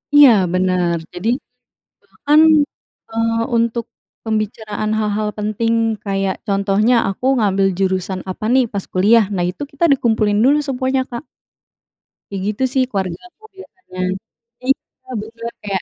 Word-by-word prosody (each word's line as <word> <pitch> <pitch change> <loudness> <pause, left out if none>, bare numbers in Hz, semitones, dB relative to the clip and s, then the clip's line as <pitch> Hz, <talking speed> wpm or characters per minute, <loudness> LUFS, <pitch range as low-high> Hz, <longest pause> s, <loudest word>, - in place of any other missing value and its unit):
Iya, 290 -2 +9 0.2
bener. 180 -2 +1 0.2
Jadi, 180 +5 -2 0.8
bahkan, 300 +2 +3 0.7
eee, 225 0 0 0.3
untuk 230 0 0 0.4
pembicaraan 215 -1 -2
hal-hal 210 0 -1
penting, 215 +2 -1 0.3
kayak 195 -1 -1
contohnya, 200 +3 +2 0.2
aku 195 - -7
ngambil 195 -3 +2
jurusan 190 -1 -1
apa 185 +3 -5
nih, 260 0 +5
pas 200 -2 -4
kuliah. 210 +4 +5
Nah, 180 - 0
itu 180 - -8
kita 285 +4 -4
dikumpulin 220 -6 +2
dulu 280 +4 +5
semuanya, 260 0 0
Kak. 240 +5 -6 1.1
Kayak 195 -1 -4
gitu 240 - -3
sih 265 - +3
keluargaku, 200 - -5 0.2
biasanya. 370 - -13 0.6
Iya, 260 0 -3
bener, 230 +2 -7 0.2
kayak 195 -2 -1
215 Hz, 125 wpm, -18 LUFS, 195-245 Hz, 1.1 s, Iya